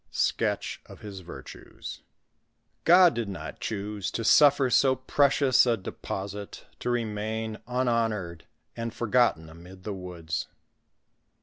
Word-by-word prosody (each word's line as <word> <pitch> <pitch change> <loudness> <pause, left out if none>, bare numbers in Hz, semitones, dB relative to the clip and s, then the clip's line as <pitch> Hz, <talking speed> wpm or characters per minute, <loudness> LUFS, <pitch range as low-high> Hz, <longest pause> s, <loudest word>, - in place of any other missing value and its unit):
— - - -40
SKETCH - - 0
OF - - -13
HIS 100 -2 -8
VIRTUES. 85 -1 -10 0.9
Gk)D 175 0 +8
did 115 -3 -3
not 95 - -7
choose 105 -2 -3
to 115 - -3
suffer 140 +3 +6
so 130 +3 +4
precious 135 0 +3
a 115 -1 +3
deposite 100 +1 -6 0.2
to - - -3
remain 110 -1 -2
unhonored 115 -9 -1 0.3
and 115 0 -4
forgotten 115 -8 +2
amid 90 +4 -13
the 105 - -4
woods. 90 -3 -5
110 Hz, 120 wpm, -27 LUFS, 95-125 Hz, 0.9 s, Gk)D